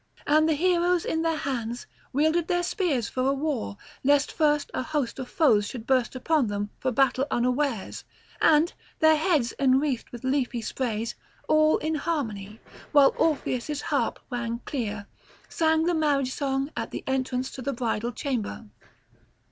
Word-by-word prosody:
And 310 +2 +4
the 315 - +3
heroes 350 +1 +2
in 320 - 0
their 325 -1 0
hands 240 -4 -3 0.3
wielded 315 +4 +2
their 350 -1 +1
spears 335 - 0
for 260 +1 0
war, 275 -8 -2 0.3
lest 285 +1 +3
first 295 -2 +1
a - - -1
host 290 -3 -2
of 255 - -5
foes 250 - +3
should 230 -1 -7
burst 255 -1 +1
upon 280 0 +1
them 205 0 -3
for 260 - 0
battle 270 +1 +2
unawares, 250 -2 -1 0.4
and, 315 +2 +4 0.2
their 315 0 +5
heads 300 -7 +1
enwreathed 265 -1 +2
with 240 0 -10
leafy 260 -3 0
sprays, 230 -2 -2 0.3
all 310 0 +4
in 315 +1 -2
harmony, 225 -10 -3 0.3
while 285 -2 +6
Orpheus' 295 -2 0
harp - - -1
rang 235 -1 -3
clear, 215 -7 -3 0.4
sang 320 -1 +2
the 350 +1 +1
marriage 285 -5 +1
song 275 +1 -1
at - - -3
the - - -6
entrance 260 -1 -1
to 260 - -8
the 280 +3 -2
bridal 235 -1 -2
chamber. 240 -3 -3
270 Hz, 155 wpm, -26 LUFS, 240-310 Hz, 0.4 s, while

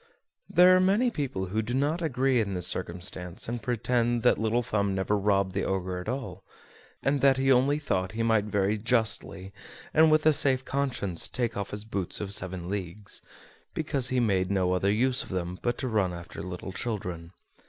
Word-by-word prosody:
There 180 +1 +7
are - - +5
many 205 +7 +3
people 130 - -3
who 110 - +1
do 120 +3 -3
not 150 +6 0
agree 135 -4 +1
in 100 -3 -2
this 90 -1 -2
circumstance, 90 0 -4
and 120 0 -3
pretend 120 0 0
that 125 - +4
Little 110 +2 +1
Thumb 100 -3 0
never 95 +2 0
robbed 100 -2 +1
the 95 - -1
Ogre 95 -1 -2
at 90 - -5
all, 110 -8 -5 0.6
and 140 0 +1
that 135 -1 +5
he 135 0 +3
only 135 +3 +4
thought 95 -11 -2
he 115 +1 -1
might 110 -2 +2
very 105 0 0
justly, 110 -4 -1 0.4
and 160 +1 +6
with 155 0 +3
a 155 - +6
safe 130 -2 +2
conscience, 130 -11 -1
take 120 -2 -2
off 100 0 -3
his 105 +1 -7
boots 100 -5 -3
of 100 -1 -3
seven 90 -3 -2
leagues, 100 +1 -5 0.5
because 140 -5 +1
he 130 - +1
made 95 -6 +1
no 95 -2 +1
other 95 +2 +2
use 125 +4 +1
of - - -9
them 90 -1 -3
but 120 0 -1
to 130 - -3
run 100 -6 +1
after 85 -1 -8
little 90 +2 -6
children. 90 -6 -4
105 Hz, 195 wpm, -28 LUFS, 95-130 Hz, 0.6 s, There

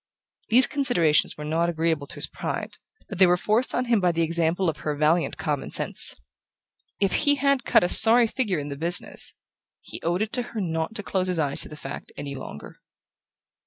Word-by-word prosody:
These 250 +4 +6
considerations 210 - +1
were 150 - -8
not 165 +3 -1
agreeable 160 -3 -2
to - - -8
his - - +3
pride, - - -6 0.3
but 195 - -9
they 190 - +6
were 180 0 +2
forced 220 +7 0
on 255 - -1
him 235 -3 +1
by 180 -1 +2
the 165 0 -1
example 170 +2 -1
of 155 -2 -2
her 150 -1 -4
valiant 155 +4 0
common - - -4
sense. - - +3 0.8
If 195 -2 0
he 290 -1 +2
had 275 -2 0
cut - - +3
a - - +1
sorry 235 +2 +8
figure 220 -5 -2
in 145 -1 -6
the 140 - -6
business, 170 +4 -1 0.4
he - - -10
owed 175 +5 -1
it 220 - -7
to 250 - -1 0.2
her - - -1
not 165 +1 -4
to 205 - -4
close 185 -1 -2
his 180 -2 0
eyes 145 -3 0
to - - -2
the 150 - -11
fact 140 0 -9
any 140 -1 -7
longer... 130 - -10
175 Hz, 205 wpm, -24 LUFS, 160-220 Hz, 0.8 s, sorry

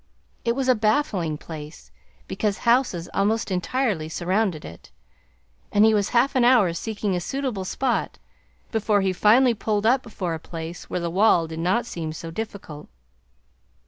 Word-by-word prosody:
It 235 0 0
was 270 -1 -1
a 255 - +6
baffling 215 - 0
place, 155 0 -10 0.4
because 210 -2 -1
houses 235 -8 +2
almost 210 +1 0
entirely 185 -2 -1
surrounded 185 0 -1
it; 85 - -12 0.8
and 210 +1 +5
he 220 - +5
was 205 -1 +1
half 245 +3 +2
an 255 - +4
hour 240 -8 +5
seeking 205 +1 -2
a - - 0
suitable 245 -1 -3
spot 250 +5 -1 0.5
before 215 -2 +1
he 190 -1 +1
finally 235 +6 +5
pulled 215 -1 -1
up 250 +3 +4
before 190 -8 -4
a 160 - -4
place 165 +1 -8
where - - -2
the 170 -1 -3
wall 185 -2 +4
did 160 0 -7
not 185 +7 +1
seem 160 -8 -5
so 165 +1 -7
difficult. 190 -6 -7
205 Hz, 160 wpm, -24 LUFS, 170-230 Hz, 0.8 s, a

